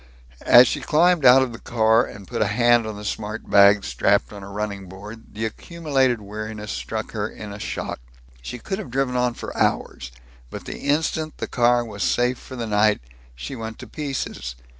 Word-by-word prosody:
As 120 +1 +9
she - - -2
climbed 170 -1 +3
out 130 +1 +8
of 125 -3 -4
the 115 - -9
car 110 0 +3
and 100 -4 -11
put 120 - -3
a 110 - +3
hand 120 +1 +3
on 110 -1 -6
the 105 - -8
smart 105 +2 -5
bags 100 0 +6
strapped - - +1
on 100 - -9
a 95 - -9
running 100 -2 -5
board, 105 +5 -11
the 110 +1 -2
accumulated 135 -1 0
weariness 105 0 -6
struck - - -4
her - - -3
in 105 -2 -9
a 100 - -9
shock. - - -4 0.4
She 125 - -6
could 190 - -4
have 215 - -7
driven 130 0 -1
on 125 -1 +1
for - - -7
hours, 70 -2 -1 0.4
but - - -8
the - - -7
instant 155 +1 -1
the - - -3
car 120 -1 +2
was 105 -3 -8
safe 125 +3 +1
for 130 - -10
the 120 -2 -4
night, 105 0 +2 0.4
she 65 - -7
went 110 -2 -6
to 130 - -9
pieces. 125 - -5
115 Hz, 200 wpm, -23 LUFS, 105-125 Hz, 0.4 s, As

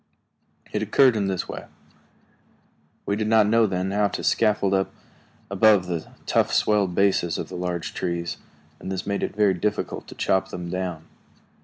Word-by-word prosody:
It - - 0
occurred 130 -4 +4
in 100 -2 0
this 95 -2 -2
way. - - -7 1.4
We 100 - 0
did 105 0 -2
not 110 -1 +4
then 95 -5 +2
know 100 - -3
how 105 0 +3
to - - -5
scaffold 105 -3 +2
up 95 0 +1 0.6
above 100 -1 +5
the 85 -3 -4 0.2
tough, - - +2
swelled 100 -4 +2
bases 95 -4 +2
of - - -5
the 95 - -7
large 90 -1 -3
trees, 85 -1 -3 0.4
and 95 - -6
this 95 -1 -3
made 100 0 -2
it - - -3
very 105 -2 +3
difficult 105 +4 -3
to - - -11
chop 95 - +1
them 85 -1 -6
down. 90 -3 -3
95 Hz, 170 wpm, -24 LUFS, 90-105 Hz, 1.4 s, above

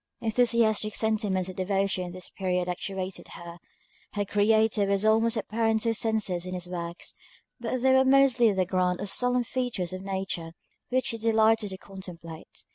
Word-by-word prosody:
Enthusiastic 225 -2 +2
sentiments 210 -4 0
of 185 - -7
devotion 195 -1 0
at - - -7
this 185 0 -7
period 180 -2 -1
actuated 185 +1 -4
her; 170 0 -10 0.5
her 205 -1 -1
Creator 210 0 +3
was 200 +1 +1
almost 225 +1 +3
apparent 220 +1 0
to 230 - +1
her - - +2
senses 210 -6 0
in 185 - -4
his 180 -1 -5
works; 170 -1 -5 0.5
but 240 +2 -2
they 265 0 +5
were 265 0 +6
mostly 265 -4 +5
the 190 -2 +1
grand 180 0 0
or - - -3
solemn 245 +4 +1
features 235 -8 -3
of 185 - -5
Nature 190 -4 -4 0.4
which 255 +1 +1
she 230 - -2
delighted 220 -1 +3
to 190 - -6
contemplate. 180 -5 -10
205 Hz, 170 wpm, -27 LUFS, 185-225 Hz, 0.5 s, were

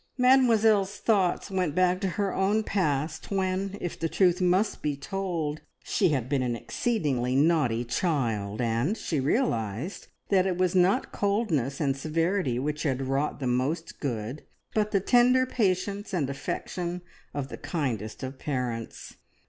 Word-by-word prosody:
Mademoiselle's 225 -6 +4
thoughts 200 -3 +1
went 180 -5 0
back 185 0 +2
to 195 - +1
her 200 -2 0
own 205 +3 +2
past, 155 -7 -1
when, 195 0 -1
if 175 - -5
the 165 - -1
truth 180 0 +3
must 185 +4 +2
be 150 -1 -1
told, 160 -1 -3 0.2
she - - +2
had 130 -6 0
been 135 0 0
an 125 -2 -1
exceedingly 135 - -1
naughty 140 -6 +2
child; 115 - -1
and 120 - 0
she 160 -8 -2
realised 130 - -1 0.2
that 190 -1 +3
it 180 -2 -1
was 185 -1 +2
not 185 +1 +3
coldness 195 - 0
and 140 -3 +1
severity 160 -1 0
which 150 +4 -2
had 135 -4 0
wrought 135 +3 -1
the 135 - -3
most 130 +7 -1
good, 120 0 -3 0.3
but 210 -1 +1
the 200 - +2
tender 250 +5 +4
patience 200 -3 -1
and 140 -6 0
affection 175 +5 -4 0.3
of 140 -2 -4
the - - -7
kindest 120 - -3
of 130 0 -6
parents. 125 -6 -4
165 Hz, 150 wpm, -27 LUFS, 135-195 Hz, 0.3 s, Mademoiselle's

